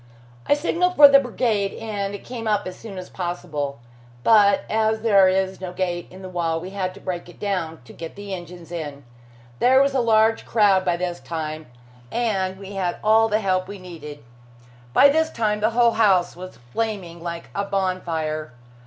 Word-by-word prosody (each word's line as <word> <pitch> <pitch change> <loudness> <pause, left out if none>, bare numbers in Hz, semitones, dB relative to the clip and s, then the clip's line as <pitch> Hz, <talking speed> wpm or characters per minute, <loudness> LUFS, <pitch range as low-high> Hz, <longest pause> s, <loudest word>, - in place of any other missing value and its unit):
I - - +5
signalled 350 +4 0
for 290 - +10
the 275 0 +7
brigade, 225 -6 -1
and 205 -3 -4
it - - -10
came 235 -3 -6
up 210 -1 +1
as 185 - -6
soon 210 -4 -10
as 185 - -7
possible. 165 -6 -4 0.5
But 205 -3 +5
as 220 0 +1
there 200 -4 +5
is 190 0 0
no 180 -1 -5
gate 175 -2 -2
in 185 +1 -12
the - - -6
wall, 170 -3 -1
we 180 +3 -8
had 185 -2 -3
to - - -11
break 175 -2 -5
it - - -15
down 175 -7 -3
to - - -13
get 165 -1 -8
the 200 -1 -7
engines 175 -1 -9
in. 145 -4 -6 0.6
There 260 +2 +5
was 275 0 +3
a 270 - +2
large 225 -1 +3
crowd 200 -4 +3
by 175 -2 +1
this 175 -1 -3
time, 155 -1 -5 0.4
and 195 -6 -1
we 195 0 -10
had 185 -3 -2
all 220 +1 +5
the 215 +1 +1
help 185 -2 0
we 200 +1 -7
needed. 160 -5 -10 0.7
By 275 - +7
this 320 +2 +2
time 210 -6 -1
the 215 +1 +2
whole 235 0 +4
house 195 -6 +3
was 185 +1 -10
flaming 175 - -4
like 170 0 -6
a 200 - -1
bonfire. 170 -7 -2
190 Hz, 190 wpm, -23 LUFS, 175-220 Hz, 0.7 s, for